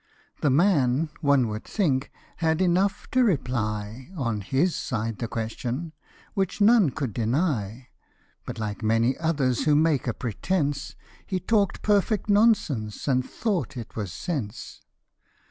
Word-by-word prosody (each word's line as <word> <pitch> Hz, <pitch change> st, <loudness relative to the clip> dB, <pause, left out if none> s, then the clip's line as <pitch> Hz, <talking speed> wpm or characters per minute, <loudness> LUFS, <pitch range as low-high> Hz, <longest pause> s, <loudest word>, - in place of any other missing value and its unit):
The 150 Hz, -, +3 dB
man, 150 Hz, -2 st, +3 dB
one 140 Hz, -5 st, +3 dB
would 105 Hz, +1 st, -5 dB
think, 145 Hz, -11 st, 0 dB, 0.3 s
had 160 Hz, -1 st, +1 dB
enough 185 Hz, +2 st, +2 dB
to 255 Hz, 0 st, +4 dB
reply 120 Hz, -, -1 dB
On 115 Hz, -7 st, -1 dB
his 140 Hz, -, +1 dB
side 115 Hz, -4 st, -3 dB
the 115 Hz, -, -2 dB
question, 120 Hz, +8 st, -4 dB, 0.4 s
which 195 Hz, -2 st, -1 dB
none 210 Hz, -4 st, +6 dB
could 130 Hz, -5 st, -4 dB
deny; 120 Hz, -, -1 dB, 0.5 s
But, -, -, -7 dB
like 105 Hz, -1 st, -4 dB
many 115 Hz, +3 st, +2 dB
others 140 Hz, -6 st, +1 dB
who 150 Hz, -1 st, +4 dB
make 150 Hz, -3 st, +2 dB
a 115 Hz, -, 0 dB
pretence, 140 Hz, -, -2 dB, 0.3 s
He 190 Hz, -2 st, -1 dB
talk'd 200 Hz, 0 st, +1 dB
perfect 210 Hz, 0 st, +2 dB
nonsense 175 Hz, -, +2 dB
and 130 Hz, -2 st, +2 dB
thought 170 Hz, -, -2 dB
it 115 Hz, -2 st, -8 dB
was 100 Hz, -5 st, -4 dB
sense. 120 Hz, -, -5 dB
140 Hz, 135 wpm, -26 LUFS, 115-180 Hz, 0.5 s, none